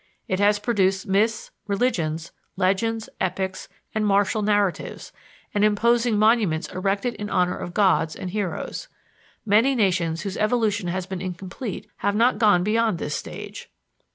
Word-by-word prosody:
It 185 - -1
has 205 +1 +4
produced 195 -3 +1
myths, 215 +3 +1 0.2
religions, 170 -7 -1 0.2
legends, 220 +4 0
epics 190 +1 -2 0.2
and 220 - 0
martial 205 +1 +2
narratives, 205 -3 -1 0.4
and 205 - +2
imposing 230 +2 +3
monuments 210 -7 +3
erected 195 +6 -1
in 205 0 -5
honor 180 0 +1
of 175 - -7
gods 185 -6 +3
and 180 - -6
heroes. 205 - -3 0.6
Many 225 +6 +4
nations 175 -7 +1
whose 195 -2 -4
evolution 215 -3 +1
has 180 +1 -2
been 190 -1 -5
incomplete 185 +4 -6
have 205 - 0
not 230 0 +3
gone 205 -5 +4
beyond 220 -1 +1
this 150 - -4
stage. - - -7
205 Hz, 140 wpm, -24 LUFS, 185-220 Hz, 0.6 s, has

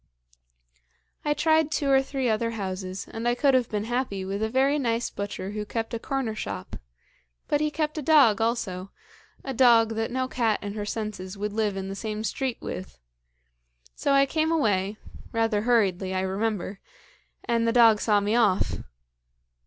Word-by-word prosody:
"I 295 0 +1
tried 315 -1 +3
two 290 -3 0
or 270 0 +6
three 270 -1 -2
other 230 +1 +1
houses, 185 -1 -4
and 225 +1 -3
I 240 - +2
could 275 +2 +3
have 255 -2 +2
been 210 -2 -2
happy 230 -5 -2
with 195 +2 -3
a 220 - 0
very 270 +4 +2
nice 235 -3 -1
butcher 200 -1 -5
who 210 0 -3
kept 225 +2 -4
a 230 - -2
corner 265 -3 -2
shop, 215 - -6 0.7
but 295 - +1
he 305 - +2
kept 305 0 -2
a - - -3
dog 270 -8 +5
also, 210 -5 -1 0.5
a 270 - -4
dog 235 -3 +5
that 225 0 -2
no 255 +1 -1
cat 230 -5 +1
in 205 0 -4
her 205 -1 -4
senses 210 -3 -5
would 205 +1 -3
live 210 -2 0
in 190 0 -4
the 195 - -4
same 215 +1 -4
street 255 +2 -2
with; 70 -9 -6 1.0
so 280 - 0
I 275 0 +5
came 315 +3 0
away 210 -9 +1 0.3
rather 225 -2 +1
hurriedly, 195 -5 +1
I 185 - +1
remember 195 0 -2 0.6
and 230 -1 +1
the - - +3
dog 230 -3 +6
saw 210 -2 +3
me 205 +2 0
off. 210 -5 +2
225 Hz, 175 wpm, -26 LUFS, 205-255 Hz, 1.0 s, or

